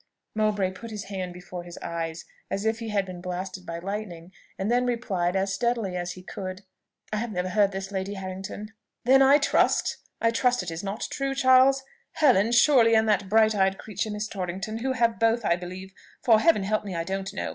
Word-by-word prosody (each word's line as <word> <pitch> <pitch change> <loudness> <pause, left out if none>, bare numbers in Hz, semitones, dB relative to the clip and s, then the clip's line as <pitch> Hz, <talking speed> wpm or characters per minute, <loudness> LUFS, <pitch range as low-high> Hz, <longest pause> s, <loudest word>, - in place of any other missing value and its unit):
Mowbray 210 -3 +1
put 230 +5 -9
his 210 -2 -5
hand 185 -3 -4
before 180 0 -8
his 175 0 -10
eyes, 165 0 -5 0.2
as 195 +2 -3
if 220 0 +1
he 230 -1 -5
had 200 -2 0
been 180 -2 -8
blasted 185 0 -5
by 170 - -4
lightning, 185 -2 -6 0.3
and 195 +4 -1
then 250 +1 +2
replied, 195 -7 -1
as 195 0 0
steadily 230 -3 -1
as 175 0 -3
he 185 - -12
could, 185 +1 -7 0.5
"I - - +1
have 230 +1 -3
never 180 -1 -2
heard 200 0 +3
this, 195 0 -5
Lady 195 +1 -3
Harrington." 195 +3 -7 0.3
"Then 265 +2 +6
I 275 +2 +7
trust 295 - +2 0.2
I 230 - +2
trust 245 -2 +1
it 175 - -5
is 165 +3 -5
not 200 +2 -3
true, 275 0 -2
Charles. 265 0 +5 0.3
Helen, 245 -9 +4
surely, 240 -2 +5
and 220 0 +3
that 205 -2 +1
bright 220 +1 +4
eyed 195 -1 +2
creature 215 +1 -4
Miss 210 0 -3
Torrington, 195 +3 -4
who 260 +2 -1
have 230 -2 +1
both, 225 0 +2
I 170 - +3
believe, 185 +2 -8 0.3
(for, 225 -4 +6
Heaven 325 -7 +3
help 215 +2 0
me, 195 -3 -5
I 165 - -1
don't 195 +2 -3
know!) 200 - -4
200 Hz, 210 wpm, -26 LUFS, 185-230 Hz, 0.5 s, I